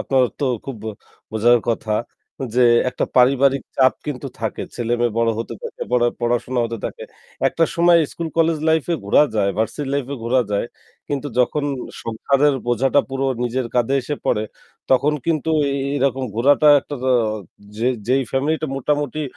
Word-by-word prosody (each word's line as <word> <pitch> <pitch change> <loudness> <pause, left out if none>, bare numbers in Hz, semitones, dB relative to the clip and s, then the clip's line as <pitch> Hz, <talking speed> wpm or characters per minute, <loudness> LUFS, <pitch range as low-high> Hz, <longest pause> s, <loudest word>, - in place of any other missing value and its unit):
আপনার 135 -1 +2 0.2
তো 140 - +1 0.2
খুব 135 -4 -6 0.5
বোঝার 120 +3 +4
কথা 110 -2 0 0.6
যে 125 - +4 0.3
একটা - - -1
পারিবারিক 135 +2 +4
চাপ 130 -1 +5
কিন্তু 140 -1 -4
থাকে। 110 -2 -3
ছেলেমেয়ে 120 -1 0
বড় 115 0 +3
হতে 115 0 -4
থাকে, - - -6
পড়া 120 -1 +3
পড়াশোনা 120 +1 0
হতে 115 -1 -4
থাকে। - - -5 0.5
একটা 165 - +1
সময় 170 -1 +5
স্কুল-কলেজ 165 -1 0
লাইফে 160 +1 +2
ঘোরা 100 - +5
যায়, 100 -2 +2
ভার্সিটি 135 +6 -2
লাইফে 140 0 -2
ঘোরা 125 +2 +3
যায়। 100 +3 0 0.4
কিন্তু 145 0 -2
যখন 140 +4 +2 0.4
সংসারের 140 +5 +1
বোঝাটা 130 +4 +3
পুরো 135 0 -2 0.2
নিজের 125 +1 -1
কাঁধে 125 +2 +2
এসে 145 +4 -3
পড়ে, 105 - +1 0.5
তখন 140 +3 +4
কিন্তু 160 -1 0 0.2
এ - - -1 0.2
এরকম 135 -1 0
ঘোরাটা 145 +5 +4
একটা, 145 - -7 0.8
যে 115 - -1 0.2
যে 125 - +3 0.2
ফ্যামিলিটা 155 +4 0
মোটামুটি 145 +2 -1
130 Hz, 150 wpm, -20 LUFS, 120-145 Hz, 0.8 s, চাপ